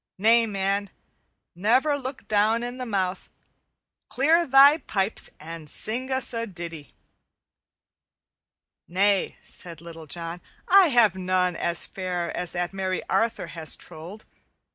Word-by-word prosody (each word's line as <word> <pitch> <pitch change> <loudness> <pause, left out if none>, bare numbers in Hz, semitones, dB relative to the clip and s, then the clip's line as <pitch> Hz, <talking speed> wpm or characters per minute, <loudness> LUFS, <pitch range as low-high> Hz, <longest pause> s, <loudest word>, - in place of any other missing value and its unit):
Nay, 225 +3 +4
man, 200 0 -1 0.6
never 250 - +2
look 260 -5 -6
down 215 +3 +2
in 245 +1 -5
the 255 - -4
mouth. 190 -4 -2 0.8
Clear 325 +6 +3
thy 275 +3 +7
pipes 195 -4 -2
and 160 0 -9
sing 250 - -3
us 260 -1 +1
a 230 0 -2
ditty." 170 -5 -9 1.9
"Nay," 195 +2 +1
said 170 -3 -8
Little 165 -1 -11
John, 170 +2 -4 0.3
"I 385 -1 +7
have 240 - +4
none 185 -1 0
as 170 0 0
fair 180 -2 -4
as 180 -1 -1
that 175 +1 -2
merry 190 -1 -2
Arthur 230 0 +1
has 160 -2 -2
trolled. 175 +7 -10
195 Hz, 125 wpm, -25 LUFS, 175-240 Hz, 1.9 s, thy